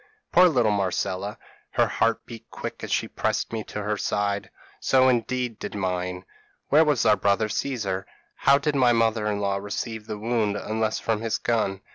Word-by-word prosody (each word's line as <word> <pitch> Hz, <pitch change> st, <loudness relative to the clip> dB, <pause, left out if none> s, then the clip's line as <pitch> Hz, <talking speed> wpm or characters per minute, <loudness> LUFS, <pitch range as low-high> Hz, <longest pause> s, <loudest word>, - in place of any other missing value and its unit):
p> 425 Hz, -, -30 dB, 0.2 s
"Poor 180 Hz, +1 st, +7 dB
little 120 Hz, -8 st, +2 dB
Marcella, 100 Hz, 0 st, -1 dB, 0.4 s
her -, -, +4 dB
heart 115 Hz, -1 st, 0 dB
beat 115 Hz, -1 st, -11 dB
quick -, -, -7 dB
as -, -, -4 dB
she -, -, +1 dB
pressed -, -, -2 dB
me 110 Hz, -1 st, -2 dB
to 105 Hz, -, -5 dB
her 105 Hz, +1 st, -1 dB
side 100 Hz, 0 st, -1 dB, 0.3 s
so 130 Hz, -1 st, +4 dB
indeed 125 Hz, -1 st, 0 dB
did -, -, -6 dB
mine. 90 Hz, -1 st, -2 dB, 0.4 s
Where 155 Hz, +3 st, +6 dB
was 150 Hz, -6 st, +2 dB
our 105 Hz, -, +6 dB
brother 100 Hz, +2 st, +1 dB
Caesar? 100 Hz, -7 st, -2 dB, 0.3 s
How 140 Hz, -, +5 dB
did 145 Hz, +2 st, -1 dB
my 125 Hz, -3 st, +4 dB
mother 115 Hz, -2 st, +2 dB
in 105 Hz, -1 st, -1 dB
law 100 Hz, -1 st, 0 dB
receive 105 Hz, +2 st, -5 dB
the 105 Hz, -, -4 dB
wound 110 Hz, -2 st, 0 dB
unless 110 Hz, 0 st, -1 dB
from 110 Hz, -1 st, -1 dB
his 115 Hz, -1 st, 0 dB
gun? 105 Hz, -5 st, 0 dB
110 Hz, 185 wpm, -25 LUFS, 100-120 Hz, 0.4 s, Poor